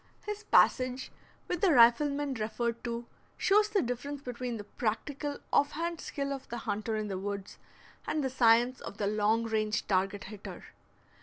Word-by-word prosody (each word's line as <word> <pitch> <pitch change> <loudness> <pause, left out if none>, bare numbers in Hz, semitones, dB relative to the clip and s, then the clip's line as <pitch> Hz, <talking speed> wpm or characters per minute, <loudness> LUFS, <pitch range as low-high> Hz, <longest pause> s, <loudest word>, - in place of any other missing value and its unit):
His 420 0 -4
passage 255 -7 +3 0.4
with 355 -1 -2
the 385 - +5
rifleman 280 +4 +5
referred 230 +1 -2
to 235 0 -3 0.3
shows 420 +1 +4
the 415 -3 +2
difference 245 +4 -4
between 245 -1 -4
the 205 - -6
practical 275 +8 -3 0.2
off 285 - +3
hand 335 +1 -3
skill 280 -1 -3
of 270 -1 -8
the 240 - -4
hunter 220 0 -2
in 215 -1 -2
the 190 -2 -3
woods 200 0 -5 0.5
and 305 - 0
the 265 - 0
science 240 0 +4
of 200 - -8
the 205 - -1
long 215 +2 +2
range 215 -2 0
target 195 +1 0
hitter. 205 0 -9
240 Hz, 165 wpm, -31 LUFS, 215-285 Hz, 0.5 s, the